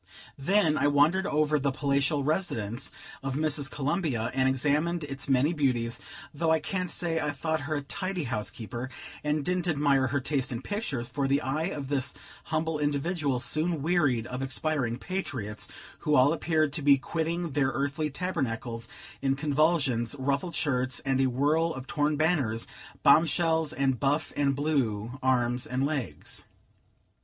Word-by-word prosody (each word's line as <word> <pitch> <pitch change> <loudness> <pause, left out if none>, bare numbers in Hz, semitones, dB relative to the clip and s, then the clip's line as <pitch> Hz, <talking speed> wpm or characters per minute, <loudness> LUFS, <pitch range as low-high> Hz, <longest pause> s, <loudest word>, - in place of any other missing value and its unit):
Then 160 +1 +3
I - - +3
wandered 155 +7 +3
over 150 -2 +2
the 140 +1 +1
"palatial 140 +1 +1
residence" 135 - -1 0.3
of 135 -1 -3
Mrs. 150 -2 -1
Columbia, 140 -6 -1
and 130 0 +3
examined 150 +5 +1
its 140 -1 -6
many 135 +5 +3
beauties, 125 -6 0 0.3
though 160 +2 0
I 160 0 +4
can't 180 +2 -2
say 165 -1 0
I 150 -1 -1
thought 160 +1 -1
her 155 - 0
a 145 - -1
tidy 185 +3 -3
housekeeper, 115 +2 -4 0.3
and 150 -1 0
didn't 180 -1 0
admire 140 -4 +3
her 140 +3 0
taste 135 -1 -1
in 120 +1 -4
pictures, 145 - -3
for 140 -1 0
the 140 +1 +3
eye 150 +4 -1
of 150 -7 -4
this 140 -2 -1 0.3
humble 160 0 -1
individual 145 -1 0
soon 155 +3 +1
wearied 145 -9 +2
of 125 +1 -5
expiring 135 -3 -1
patriots, 130 - -4 0.3
who 150 - +1
all 135 +4 +5
appeared 155 -3 +1
to 150 - -1
be 140 -1 +6
quitting 165 +4 -2
their 135 -1 +2
earthly 140 +3 -1
tabernacles 130 -9 -3 0.3
in 135 0 +2
convulsions, 145 -4 +2
ruffled 140 +6 -1
shirts, 130 -5 0
and 135 -1 +1
a 135 - +4
whirl 150 +6 +1
of 130 -1 -7
torn 150 -1 +1
banners, 140 -9 +1 0.4
bomb 165 +2 +7
shells, 160 -1 +1
and 135 -4 0
buff 145 +2 0
and 140 -1 +2
blue 130 -5 -1
arms 125 -1 +1
and 130 +3 0
legs. 135 - -3
145 Hz, 160 wpm, -28 LUFS, 130-160 Hz, 0.4 s, bomb